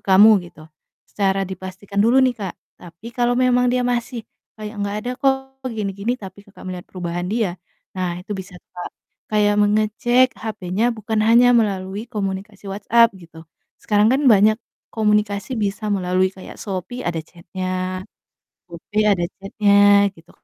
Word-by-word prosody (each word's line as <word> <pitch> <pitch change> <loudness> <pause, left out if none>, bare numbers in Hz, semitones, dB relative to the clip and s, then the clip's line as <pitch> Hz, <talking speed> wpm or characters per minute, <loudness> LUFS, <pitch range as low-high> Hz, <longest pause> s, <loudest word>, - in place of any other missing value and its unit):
kamu?" 200 +3 +7 0.2
gitu, 155 -1 -16 0.4
secara 195 -1 0
dipastikan 190 +1 -5
dulu 235 +5 +4
nih, 245 -3 -1
Kak, 190 -3 -4 0.3
tapi 180 +7 -11
kalau 245 0 +1
memang 250 0 +3
dia 250 0 +1
masih 240 -1 -2 0.3
kayak, 215 0 -7
"Nggak 200 +1 -2
ada 245 - -2
kok 270 0 +3 0.4
gini 210 -3 -2
gini," 215 +5 -1
tapi 195 +1 -11
Kakak 200 -1 -16
melihat 180 -1 -6
perubahan 175 -1 -4
dia, 200 -3 -1 0.4
nah 180 -2 -1
itu 205 +2 -6
bisa, 190 0 -8
Kak, 180 - -9 0.4
kayak 205 -1 +3
mengecek 215 +5 +3
HP-nya 215 +1 -2
bukan 215 0 -1
hanya 240 +2 +6
melalui 200 -1 -1
komunikasi 200 -2 -5
WhatsApp 225 +4 +4
gitu. 165 -3 -15 0.3
Sekarang 210 +3 +3
kan 270 - +2
banyak 215 +1 +5 0.3
komunikasi 210 +1 0
bisa 210 0 -2
melalui 185 -2 +1
kayak 190 0 -12
Shopee 200 +5 -5
ada 175 -7 -3
chat-nya, 185 +2 -5 0.7
GoPay 190 +5 -2
ada 175 - 0 0.2
chat-nya, 200 0 +4
gitu 165 -1 -20
205 Hz, 145 wpm, -21 LUFS, 185-225 Hz, 0.7 s, kamu